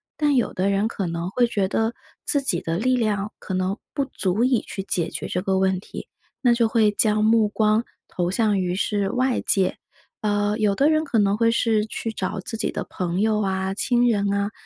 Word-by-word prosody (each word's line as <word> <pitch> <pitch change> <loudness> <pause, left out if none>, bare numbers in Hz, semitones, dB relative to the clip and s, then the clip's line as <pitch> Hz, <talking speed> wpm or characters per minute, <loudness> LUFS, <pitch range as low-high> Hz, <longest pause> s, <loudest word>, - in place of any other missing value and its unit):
但 295 -2 +1
有 245 - +1
的 190 +2 0
人 200 +2 +1
可 195 -5 -3
能 170 +2 -4
会 245 +3 +2
觉 200 -4 0
得 225 +4 -1 0.3
自 285 - +1
己 195 -11 0
的 165 +1 -2
力 255 +6 +2
量 210 -3 -1
可 190 - -5
能 185 +2 -1 0.2
不 280 -2 0
足 200 -3 -1
以 250 -3 +2
去 195 - -6
解 175 -4 -1
决 - - -5
这 180 - -2
个 190 0 0
问 190 -1 +1
题， - - -9 0.3
那 245 -3 +4
就 235 -1 +2
会 220 -2 +3
将 215 0 +2
目 220 -1 +4
光 215 +1 +2 0.2
投 175 -1 -2
向 210 0 +1
于 180 -1 -1
是 200 0 0
外 255 0 +1
界， 190 -2 +1 0.4
呃， 205 0 0
有 210 -2 +2
的 280 +6 +3
人 310 0 +2
可 245 -6 +1
能 200 0 +2
会 230 0 +3
是 225 -2 +1
去 225 +1 -4
找 190 -3 -4
自 225 +4 -4
己 - - -1
的 - - -4
朋 180 +1 -2
友 215 0 +2
啊、 190 -1 -1
亲 245 +3 +2
人 200 -3 +1
啊， 200 +1 -1
210 Hz, 235 characters per minute, -23 LUFS, 190-230 Hz, 0.4 s, 那